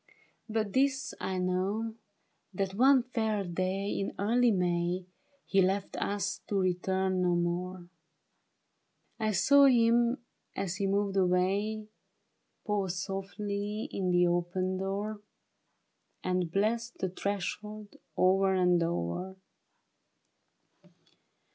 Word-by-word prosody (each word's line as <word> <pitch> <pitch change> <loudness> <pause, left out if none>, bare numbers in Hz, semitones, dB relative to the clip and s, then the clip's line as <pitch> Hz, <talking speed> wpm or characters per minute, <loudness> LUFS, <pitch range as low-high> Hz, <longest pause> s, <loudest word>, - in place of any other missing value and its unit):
But 215 -2 -1
this 270 0 +1
I 190 - -2
know, 190 +5 -1 0.6
that 195 0 -1
one 260 +4 +5
fair 220 -4 -1
day 185 +2 -2
In 195 - -3
early 235 +4 +3
May, 180 -2 0 0.4
He 195 - +3
left 195 +2 0
us 200 -1 -2
to 200 - 0
return 185 0 0
no 180 -1 +2
more. 175 +1 -2 1.3
I 220 -1 +1
saw 280 +10 +6
him 240 -1 +4 0.4
as 190 -1 -3
he 195 - 0
moved 200 0 0
away. 195 +4 +1 0.8
Pause 195 -4 -1
softly 200 +2 -4
in 185 -2 -1
the 175 0 +4
open 175 +2 0
door. 205 +2 -3 1.0
And 180 -2 0
bless 225 +5 +1
the 190 -5 -4
threshold 205 +2 -4 0.2
o'er 190 +1 +4
and 180 -2 +3
o'er. 170 - -2
195 Hz, 105 wpm, -30 LUFS, 185-215 Hz, 1.3 s, saw